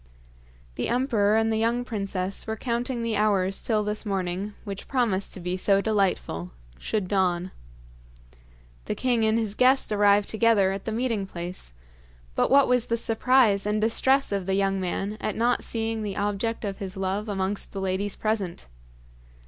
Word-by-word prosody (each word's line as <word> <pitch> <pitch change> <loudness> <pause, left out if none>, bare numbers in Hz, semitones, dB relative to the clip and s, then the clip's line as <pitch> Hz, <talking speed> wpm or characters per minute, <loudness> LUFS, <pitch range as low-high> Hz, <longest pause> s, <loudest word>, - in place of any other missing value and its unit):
The - - -1
emperor 230 -4 +2
and 225 0 +2
the 220 - 0
young 235 +2 0
princess 195 -4 -3
were 220 - -2
counting 240 +1 -2
the 230 -1 -1
hours 195 -2 +2
till 215 -2 +1
this 210 +1 -3
morning, 195 0 -3
which 200 -2 -7
promised 230 -8 0
to - - -8
be 180 +1 -2
so 195 +1 +3
delightful, 195 - 0 0.3
should 205 - -2
dawn. 185 -2 0 1.3
The - - -2
king 245 -3 +1
and 220 +1 +2
his 220 -3 -1
guest 255 +2 +3
arrived 205 -1 +4
together 220 -4 +3
at 195 0 -5
the 220 - -2
meeting 225 -4 -1
place, 175 - -7 0.6
but - - +1
what 275 0 +6
was 250 -2 +2
the 230 - 0
surprise 225 -3 +3
and 210 +1 +1
distress 260 +5 +2
of 195 -2 -2
the 190 - +1
young 195 0 +1
man 195 +4 -3
at 215 - -2
not 240 +2 +1
seeing 225 -1 -2
the 205 -2 -4
object 205 +3 -2
of 195 -1 -4
his 190 -1 -6
love 195 +3 -2
amongst 195 0 -2
the 195 - -5
ladies 190 +1 -1
present. 205 - -2
210 Hz, 170 wpm, -26 LUFS, 195-225 Hz, 1.3 s, what